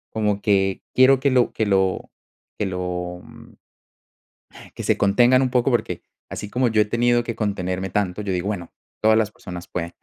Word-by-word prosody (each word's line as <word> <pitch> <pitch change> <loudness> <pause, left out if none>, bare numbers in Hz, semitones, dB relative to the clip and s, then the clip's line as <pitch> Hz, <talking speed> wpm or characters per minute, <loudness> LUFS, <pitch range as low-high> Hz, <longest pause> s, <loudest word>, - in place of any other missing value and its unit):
como 105 -2 0
que 95 -2 +1
quiero 130 +1 +5
que 140 +1 +1
lo 125 -2 +3
que 110 - -1
lo 95 -2 0 0.5
que 105 - -1
lo, 90 -1 -4
mm - - -16 1.2
que - - -6
se - - +1
contengan 120 +6 +4
un 130 - +1
poco, 125 +1 +1
porque 120 - -1 0.3
así 105 - -6
como 125 +4 +1
yo 110 -1 +3
he - - +2
tenido 120 +2 +2
que 115 -1 -5
contenerme 95 -3 -2
tanto, 95 0 -1
yo 100 -2 -2
digo, 90 +1 -2
bueno, 95 -5 -4 0.3
todas 110 0 +4
las 110 -2 +1
personas 90 -4 -9
pueden. 85 -1 -5
105 Hz, 185 wpm, -22 LUFS, 95-120 Hz, 1.2 s, quiero